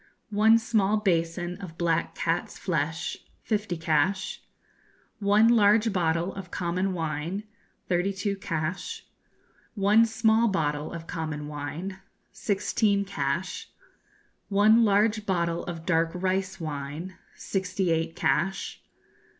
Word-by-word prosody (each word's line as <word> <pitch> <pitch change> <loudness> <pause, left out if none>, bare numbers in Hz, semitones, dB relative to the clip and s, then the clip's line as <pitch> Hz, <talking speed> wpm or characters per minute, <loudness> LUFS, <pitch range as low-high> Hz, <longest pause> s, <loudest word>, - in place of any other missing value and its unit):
One 220 +2 +6
small 215 -3 +2
basin 175 -2 0
of 165 -4 -9
black 170 -1 0
cat's 170 +1 -1
flesh 160 -1 -2 0.3
fifty 210 -5 -1
cash. 165 +4 0 0.8
One 205 +2 +4
large 220 -1 +4
bottle 170 0 0
of 195 -3 -8
common 180 +3 -1
wine 165 +4 -3 0.4
thirty 180 +2 +1
two 200 +1 -2
cash. 185 - -4 0.7
One 210 +3 +5
small 225 0 +3
bottle 150 -7 -1
of 165 -1 -7
common 155 -3 -4
wine 150 +6 -5 0.3
sixteen 200 0 +1
cash. 160 -1 -3 0.8
One 215 +3 +5
large 210 +1 +2
bottle 170 -3 0
of 165 -2 -6
dark 165 -2 +2
rice 190 +1 -1
wine 155 +3 -5 0.2
sixty 190 -1 -1
eight 165 0 0
cash. 195 +2 0
185 Hz, 110 wpm, -27 LUFS, 165-205 Hz, 0.8 s, One